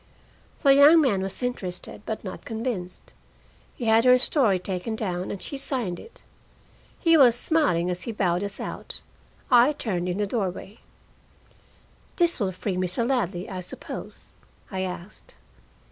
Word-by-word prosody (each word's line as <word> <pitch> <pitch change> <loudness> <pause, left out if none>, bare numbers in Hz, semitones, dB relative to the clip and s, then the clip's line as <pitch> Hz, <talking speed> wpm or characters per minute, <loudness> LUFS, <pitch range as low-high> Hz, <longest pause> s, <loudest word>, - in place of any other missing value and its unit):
The 275 -2 +7
young 290 +4 +8
man 235 -11 +2
was 195 +5 -4
interested, 190 -8 -4
but 220 - -4
not 185 -2 -7
convinced. 220 -6 -5 0.6
He 240 - -5
had 225 0 +5
her 250 0 +7
story 250 - +2
taken 185 +4 -3
down, 185 -4 -3
and 200 - -4
she 280 - -6
signed 240 -11 -2
it. - - -14 0.8
He 330 -1 +4
was 250 -5 +7
smiling 245 - +1
as 180 0 -3
he 235 - -4
bowed 180 -3 0
us 200 -1 -5
out. - - -6 0.5
I 250 +4 +6
turned 180 -10 -2
in 180 - -2
the 205 - +1
doorway. 200 0 -3 1.4
"This 345 -4 +2
will 195 -4 0
free 185 +1 -3
Mr. 185 +6 -1
Ladley, 200 -9 -1
I 185 -1 -5
suppose?" 180 - -8 0.4
I 190 - -3
asked. 185 +1 -7
210 Hz, 150 wpm, -25 LUFS, 185-250 Hz, 1.4 s, young